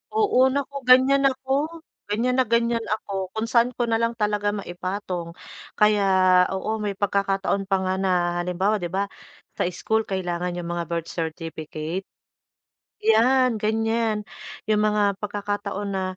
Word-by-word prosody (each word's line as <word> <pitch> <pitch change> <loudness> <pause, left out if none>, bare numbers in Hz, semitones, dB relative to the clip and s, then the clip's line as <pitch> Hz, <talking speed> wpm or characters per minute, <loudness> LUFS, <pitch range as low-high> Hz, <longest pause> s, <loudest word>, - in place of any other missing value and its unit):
Oo, 425 - +2 0.2
naku 280 0 -3
gan'yan 265 +2 +6
ako, 265 0 -3 0.6
gan'yan 235 +5 0
na 260 - +4
gan'yan 235 0 +1
ako. 210 - -11 0.2
Kung 220 - -1
saan 240 0 +3
ko 245 - 0
na 230 -1 +1
lang 230 0 0
talaga 210 -1 0
maipatong, 180 -2 -5 0.4
kaya 210 -1 +4 0.5
oo 190 - -4
may 205 -1 -2
pagkakataon 195 0 0
pa 195 - +2
nga 185 0 0
na 190 - 0 0.3
halimbawa 185 +4 0
'di 175 - -3
ba, 195 +3 -1 0.5
sa - - +2
school 220 +5 -1
kailangan 180 -2 -2
yung 175 -1 -5
mga 170 -2 -3
birth 170 -1 -3
certificate. 160 +1 -5 1.0
'Yan, 235 +1 +4
gan'yan. 220 0 0 0.4
'Yong 215 -1 +2
mga 210 0 +1 0.2
pagkakataon 205 0 -3
na, 190 - -1
205 Hz, 140 wpm, -24 LUFS, 185-230 Hz, 1.0 s, gan'yan